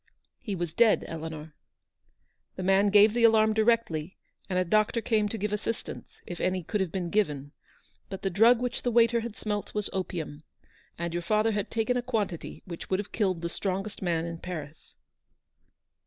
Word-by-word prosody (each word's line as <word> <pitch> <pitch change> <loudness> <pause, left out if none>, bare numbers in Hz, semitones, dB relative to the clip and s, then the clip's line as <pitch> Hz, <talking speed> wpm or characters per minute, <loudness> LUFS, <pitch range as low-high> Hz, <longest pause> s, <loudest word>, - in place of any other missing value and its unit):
He 210 -5 -4
was 175 -3 -3
dead, 225 +2 +4
Eleanor. 160 -1 -7 1.0
The 185 - -5
man 195 +2 +4
gave 205 +1 +6
the 240 0 +1
alarm 220 -1 +5
directly, 215 -7 +1 0.3
and 185 - 0
a 185 - +2
doctor 215 +5 +2
came 215 -2 +1
to 225 - -4
give 210 0 -2
assistance, 215 +2 -5
if 175 - -6
any 185 -1 0
could 205 +5 -1
have 185 -4 -1
been 180 -3 -3
given; 150 -9 0 0.6
but 195 - -7
the 195 - 0
drug 225 +6 +5
which 245 0 -2
the 245 - 0
waiter 235 0 +4
had 230 -1 -6
smelt 210 -1 -4
was 210 -1 -1
opium, 165 -5 -4 0.6
and 170 0 -3
your 175 - -1
father 215 +5 +2
had 205 -2 -2
taken 230 +2 0
a - - 0
quantity 215 -9 -3
which 170 -3 -8
would 185 - +2
have 205 - -5
killed 190 -6 0
the - - 0
strongest 195 +3 -3
man 170 -3 0
in 165 -1 -6
Paris." 160 -4 -8
200 Hz, 185 wpm, -28 LUFS, 170-220 Hz, 1.0 s, gave